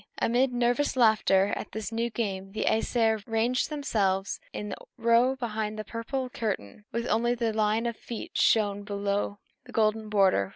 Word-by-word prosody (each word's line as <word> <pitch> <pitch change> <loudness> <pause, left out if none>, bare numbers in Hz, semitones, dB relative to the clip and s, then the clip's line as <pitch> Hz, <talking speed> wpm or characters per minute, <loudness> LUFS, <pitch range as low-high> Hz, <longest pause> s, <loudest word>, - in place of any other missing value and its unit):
Amid 250 +3 +2
nervous 245 +4 +1
laughter 210 -4 +4
at - - -7
this 220 0 -4
new 230 +1 -1
game, 195 -4 -3
the 215 - -1
Æsir 220 -1 +1
ranged 230 +3 +1
themselves 200 -10 0
in 210 0 -5
a - - -8
row 235 +3 +4
behind 220 -4 -3
the 215 - -3
purple 255 +3 -3
curtain, 210 - -4
with 235 +1 -2
only 240 0 +1
their 230 -2 -1
line 215 +1 +1
of 235 -1 -1
feet 230 0 -7
showing 205 -2 +2
below 200 0 -2 0.3
the - - -12
golden 215 0 +1
border. 190 - +3
220 Hz, 165 wpm, -28 LUFS, 205-235 Hz, 0.3 s, laughter